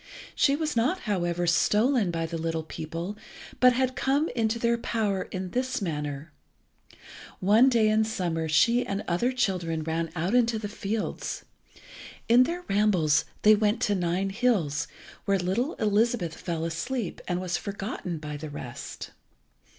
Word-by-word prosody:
She 275 - +3
was 310 -1 -2
not, 265 +11 +1
however, 175 -5 -1
stolen 210 +5 +3
by 165 -1 -1
the 165 0 -4
little 165 0 -2
people, 165 +5 -5 0.4
but 250 0 +6
had 260 +1 0
come 285 +4 +1
into 225 -1 0
their 235 0 +2
power 210 -5 -1
in 185 -1 -5
this 255 +1 -1
manner. 150 -4 -4 1.1
One 215 +7 +5
day 230 -4 +3
in 215 +1 +3
summer 170 -7 -2
she 235 +10 +4
and 200 +1 -3
other 205 +9 +1
children 180 -10 -1
ran 165 +1 -2
out 175 +5 -1
into 235 -2 +3
the 215 -1 -4
fields. 210 +1 -4 0.8
In 245 +2 +6
their 350 +4 -4
rambles 190 -8 +3 0.2
they 215 - +8
went 210 +1 +2
to 205 - +2
the 190 - -1
Nine 180 +3 0
hills, 190 - +1 0.4
where 200 0 +2
little 195 - -1
Elizabeth 215 -4 +1
fell 165 -2 -3
asleep, 185 +6 -3
and 175 0 -1
was 180 -1 -2
forgotten 200 -3 -5
by 150 -1 -6
the 155 +1 -7
rest. 125 -4 -7
200 Hz, 155 wpm, -27 LUFS, 165-235 Hz, 1.1 s, they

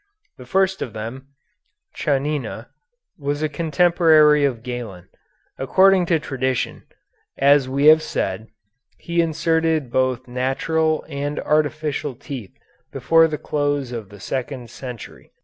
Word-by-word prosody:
The 125 - -11
first 190 +4 +1
of 115 - -4
them, 115 +5 -7 0.7
Chanina, 145 0 -2 0.5
was 145 +1 -2
a - - +2
contemporary 155 -1 +4
of 120 -5 -2
Galen. 120 -8 -7 0.5
According 185 +6 +4
to 165 - +3
tradition, 130 -3 -3 0.5
as 140 -1 +4
we 140 +2 0
have 155 +1 +8
said, 100 -5 -3 0.5
he 170 0 0
inserted 160 -3 0
both 130 0 0
natural 155 +6 0
and 145 0 -4
artificial 150 -2 -1
teeth 125 - -9 0.3
before 165 0 +4
the 155 -1 -4
close 145 -4 -2
of 115 -5 -6
the 100 - -13
second 125 0 -5
century. 125 -4 -10
145 Hz, 120 wpm, -21 LUFS, 130-155 Hz, 0.7 s, have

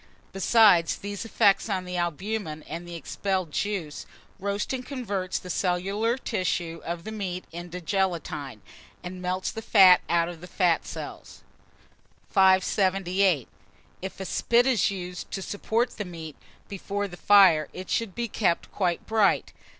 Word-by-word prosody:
Besides 195 -4 +5
these 200 +2 -6
effects 200 0 +3
on 185 -2 -1
the 180 0 -5
albumen 175 -1 -3
and 170 +1 -7
the 175 - -7
expelled 185 0 -2
juice, 165 0 -3 0.3
roasting 200 +6 -2
converts 205 -9 -3
the 180 - -6
cellular 195 +7 0
tissue 180 -8 -2
of 170 0 -4
the 220 - -6
meat 185 -4 -4
into 175 +1 -7
gelatine, 165 - -2 0.4
and 180 0 -7
melts 185 +1 -2
the 225 - -6
fat 190 -5 +7
out 170 -1 +2
of 170 -2 -8
the 180 - -9
fat 180 -3 +1
cells. - - -8 0.9
578. 190 - +3 0.5
IF 190 +1 -6
A 190 - -4
SPIT 235 +5 +2
is 255 -6 +3
used 180 -2 -6
to - - -4
support 230 +5 -1
the 210 - -5
meat 165 -5 -8 0.3
before 200 +1 -3
the 175 - -10
fire, 180 -6 +5
it 185 - -8
should 225 -5 -1
be 235 0 -2
kept 195 -5 0
quite 180 -4 -1
bright. 220 -3 +2
185 Hz, 145 wpm, -26 LUFS, 175-205 Hz, 0.9 s, fat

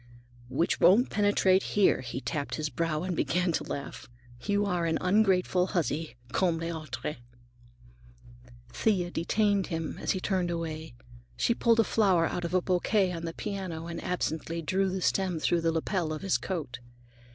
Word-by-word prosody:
"Which 170 +6 0
won't 225 +8 +5
penetrate 205 -2 +3 0.2
here," 200 - +4
he 125 +1 -5
tapped 145 -1 -3
his 155 -1 -2
brow 165 0 -1
and 180 -1 -2
began 180 +2 +1
to - - -1
laugh. 140 -3 -6 0.3
"You 205 0 +1
are 175 -4 0
an 160 - +1
ungrateful 185 -2 +2
huzzy, 160 - -2 0.2
comme 175 +2 +1
les 165 +1 -3
autres!" 155 -2 -5 1.5
Thea 185 -5 0
detained 200 +3 +1
him 165 -2 -4
as - - 0
he 190 - -2
turned 185 -2 0
away. 160 -4 -4 0.4
She 235 - +2
pulled 230 -1 +3
a - - +2
flower 190 -7 +3
out 175 - -2
of 170 +2 -2
a 185 - +2
bouquet 185 +1 +2
on 170 -1 -5
the 165 - -4
piano 190 -6 -4
and 170 0 -6
absently 165 -1 -2
drew 190 +4 +1
the 185 0 -3
stem 185 -2 +1
through 170 +2 +1
the 165 0 +2
lapel 165 0 -1
of 155 - -5
his 195 - +1
coat. 155 -10 -4
175 Hz, 170 wpm, -29 LUFS, 165-190 Hz, 1.5 s, won't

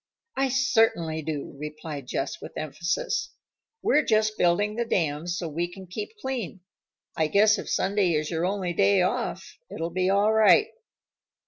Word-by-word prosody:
"I 270 0 +1
certainly 225 -12 +2
do," 150 -2 -5
replied 150 -2 -7
Jess - - -3
with - - -9
emphasis. 170 - -2 0.5
"We're 300 - +4
just 215 -1 +2
building 205 +3 +2
the 235 - 0
dam 165 -7 -1
so 175 -1 -2
we 170 +3 -3
can 190 +1 -10
keep 210 - -7
clean. 240 - -4 0.5
I 160 - +1
guess 210 +5 +4
if - - -6
Sunday 190 -2 +1
is 155 +1 -1
your 165 0 -1
only 185 -1 -1
day 195 0 +4
off, 180 - -3
it'll 165 +1 -4
be 185 +1 0
all 200 +2 +3
right." 220 - +5
185 Hz, 155 wpm, -26 LUFS, 165-215 Hz, 0.5 s, right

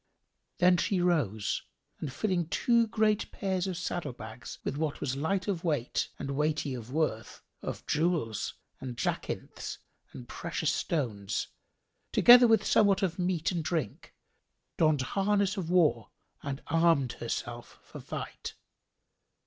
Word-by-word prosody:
Then 180 0 +5
she 190 +1 +1
rose 125 - +1 0.4
and 150 - -4
filling 175 +3 0
two 235 +6 +3
great 215 -1 +1
pairs 190 -1 -1
of 185 -3 -3
saddle 170 -5 -3
bags 110 +1 -9
with 140 - -2
what 150 -1 -2
was 130 - -2
light 185 +7 -1
of 185 -5 -1
weight 145 -8 0
and 140 -1 -4
weighty 150 0 0
of 120 -1 -7
worth 145 -7 -2 0.2
of - - -5
jewels 150 - 0 0.2
and 125 -2 -6
jacinths - - -3 0.3
and 120 - -10
precious 165 +1 -2
stones, 115 - -2 0.6
together 245 0 +8
with 225 -2 +4
somewhat 200 -2 +4
of 180 -1 -1
meat 180 -2 0
and 170 -3 -2
drink, 155 - -3 0.6
donned 155 -4 +3
harness 200 +5 +1
of 180 -5 -4
war 175 -3 +3 0.3
and 140 -1 -5
armed 165 -5 +3
herself 120 0 -5
for - - -10
fight. - - -6
160 Hz, 135 wpm, -30 LUFS, 135-185 Hz, 0.6 s, together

